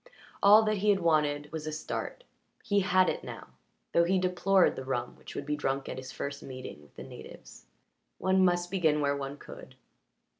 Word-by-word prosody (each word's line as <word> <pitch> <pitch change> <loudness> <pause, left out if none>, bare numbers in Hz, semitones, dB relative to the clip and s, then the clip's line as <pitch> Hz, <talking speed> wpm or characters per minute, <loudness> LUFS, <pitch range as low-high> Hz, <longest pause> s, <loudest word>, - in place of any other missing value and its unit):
All 210 +2 +8
that 215 -1 +1
he 210 +2 +1
had 200 -2 +4
wanted 150 -3 +1
was 155 -1 -5
a - - -2
start; 155 - -5 0.4
he 205 0 +2
had 185 -1 +3
it - - -2
now, - - -9 0.4
though 170 - +4
he 185 +3 +2
deplored 185 +1 +3
the 130 - -6
rum 125 -2 -3
which - - -12
would 140 - -4
be 150 +1 -1
drunk 135 -2 -2
at - - -5
his 130 0 -8
first 140 0 -5
meeting 130 - -8
with 70 -2 -21
the - - -8
natives. - - -12 0.5
One 190 0 +2
must 175 -1 +1
begin 160 -6 +2
where 140 -1 +1
one 140 0 -5
could. - - -12
155 Hz, 195 wpm, -29 LUFS, 140-185 Hz, 0.5 s, All